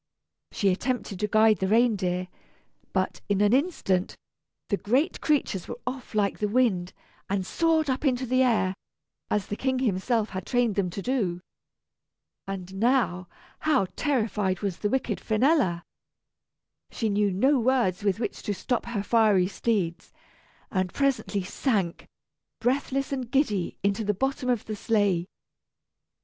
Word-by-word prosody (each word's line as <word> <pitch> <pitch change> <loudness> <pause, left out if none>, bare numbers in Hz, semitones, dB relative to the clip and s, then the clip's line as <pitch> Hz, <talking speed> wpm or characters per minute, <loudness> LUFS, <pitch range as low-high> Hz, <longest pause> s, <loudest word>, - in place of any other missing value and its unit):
She 200 - +1
attempted 210 0 -2
to 210 - 0
guide 215 0 +4
the 190 - 0
reindeer, 190 -5 +2 0.6
but, - - -1
in 200 -1 +2
an 205 +2 +4
instant, 255 - +1 0.5
the 200 - +1
great 260 - 0
creatures 270 - 0
were - - -6
off 250 -2 -5
like 205 -2 +1
the 210 - +1
wind, 205 -6 +1 0.4
and 195 -1 -1
soared 325 - +1
up 260 +1 -1
into 260 -3 +1
the 255 +1 +2
air, 225 -7 +2 0.6
as 210 -2 0
the 205 - -4
King 260 +3 0
himself 225 -1 0
had 185 -1 -5
trained 245 -3 +2
them 190 -2 0
to 190 +3 -6
do. 210 -10 0 1.1
And 190 -1 -6
now, 200 -6 +1 0.3
how 300 -9 +2
terrified 215 - 0
was 195 -4 -2
the 205 - 0
wicked 250 -4 -1
Finella! 220 - +2 1.1
She 225 - -2
knew 205 0 +2
no 260 +9 +3
words 230 -6 +1
with 200 0 +1
which 235 - -3
to 205 - -2
stop 240 +4 -2
her 220 -4 -2
fiery 210 -5 +4
steeds, 185 -4 -2 0.6
and 185 -2 0
presently 265 -8 0
sank, 190 -3 -1 0.5
breathless 270 +2 0
and 260 -4 -3
giddy, 220 - 0
into 200 +2 +1
the 210 -1 0
bottom 270 +3 -1
of 240 -4 0
the 215 - -4
sleigh. 200 -5 +1
215 Hz, 145 wpm, -26 LUFS, 190-255 Hz, 1.1 s, guide